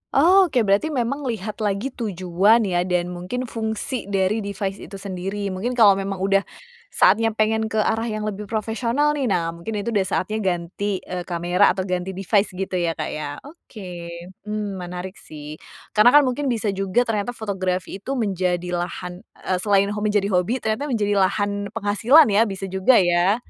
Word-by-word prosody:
Oh 370 +7 +6
oke. 255 -7 +1
Berarti 200 +7 +2
memang 275 -1 -2
lihat 215 -2 -4
lagi 210 +5 -1
tujuan 200 0 +2
ya 180 -2 0
dan 180 -1 0
mungkin 180 +8 -4
fungsi 225 0 -4
dari 195 +2 +1
device 200 -1 -4
itu 195 - -10
sendiri. 195 +1 -4
Mungkin 220 +7 -3
kalau 205 -5 +6
memang 195 0 -3
udah 195 0 +2 0.4
saatnya 225 0 +3
pengen 220 0 +1
ke 220 - -6
arah 225 +1 +1
yang 215 -1 -3
lebih 210 -1 -4
profesional 230 +7 0
nih, 285 -3 -1
nah 170 -5 0
mungkin 170 +6 -6
itu 205 +3 -2
udah 200 -4 +1
saatnya 215 +5 -1
ganti, 190 +1 -2
eee, 180 -1 -6
kamera 175 +1 +2
atau 190 - -2
ganti 185 0 -3
device 195 0 +1
gitu 190 0 -3
ya, 170 -2 0
Kak, - - -4
ya? 150 -1 -5
Oke, 190 - -10 0.4
mmm, 210 -2 -3
menarik 180 +2 -7
sih 150 0 -10 0.3
karena 220 +6 +5
kan 295 - +8
mungkin 270 +2 -1
bisa 225 -4 0
juga 195 +4 +1
ternyata 225 +1 -2
fotografi 190 -3 -3
itu 265 +7 -4
menjadi 180 -6 -1
lahan, 175 0 -4
eee, 185 -1 -4
selain 200 0 +2
hom 210 - -3
menjadi 205 -1 +1
hobi, 185 +8 0
ternyata 220 +7 -1
menjadi 205 -6 +1
lahan 200 +1 0
penghasilan 225 +8 +5
ya 215 +3 +4
bisa 195 -1 -6
juga 190 +7 +4
ya? 175 0 +4
200 Hz, 175 wpm, -22 LUFS, 185-225 Hz, 0.4 s, kan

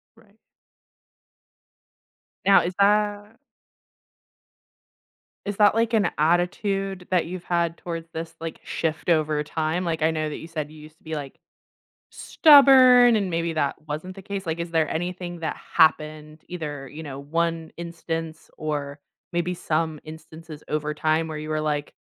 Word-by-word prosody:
Right. 220 -2 -24 2.1
Now, 195 0 +7
is 180 +1 -3
that 205 +1 +2 2.1
is 200 -1 -4
that, 210 0 +5
like, 230 0 +1
an 205 -5 +3
attitude 180 +3 0
that 180 -2 +2
you've 180 +1 -7
had 170 -1 0
towards 165 -1 -6
this, 165 0 -6
like, 165 -1 -6
shift 160 +1 -3
over 155 -2 +2
time? 160 +4 -2
Like, 160 -2 -2
I 160 - +3
know 155 -1 -2
that 150 - -5
you 165 - -9
said 155 -2 -5
you 155 - -13
used 155 +1 -14
to - - -33
be, 160 -1 -5
like, 140 -2 -7 0.7
stubborn 260 -5 +7
and 200 -3 -1
maybe 165 -1 -1
that 145 -3 0
wasn't 160 +6 -5
the 195 - -10
case, 195 0 -5
like, 165 0 -3
is 170 0 -4
there 160 -2 +1
anything 175 +1 -4
that 160 - -3 0.2
happened 155 -1 +2
either, 150 -6 -6
you 150 +4 -9
know, 140 -3 -7
1 165 +2 -2
instance 165 -1 -6
or 145 -2 -4 0.3
maybe 175 +1 0
some 160 -2 -2
instances 160 0 -11
over 150 0 -1
time 155 +1 0
where 155 - -5
you 155 0 -6
were 155 0 0
like, 150 -1 -2
165 Hz, 155 wpm, -24 LUFS, 155-180 Hz, 2.1 s, Now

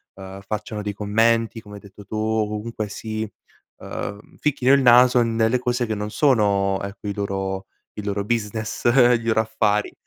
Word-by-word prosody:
uhm, 95 0 -10
facciano 105 +1 -5
dei 105 0 -4
commenti 115 +3 +1
come 105 -2 -12
hai 100 - -10
detto 100 0 -14
tu 110 - -8
comunque 110 0 -2
si, 110 +1 -5 0.5
uhm, 100 +1 -7
ficchino 135 -3 +2
il 140 - +5
naso 125 0 +6
nelle 115 +1 +1
cose 125 0 -1
che 110 - -2
non 105 +1 -4
sono 100 -7 +2
ecco, 100 +1 -7
i 100 - -1
loro 95 -1 -3 0.3
i 105 - -5
loro 100 0 -1
business, 110 0 -3
i 120 -1 +5
loro 110 -1 +2
affari, 110 -2 0
110 Hz, 165 wpm, -22 LUFS, 100-115 Hz, 0.5 s, naso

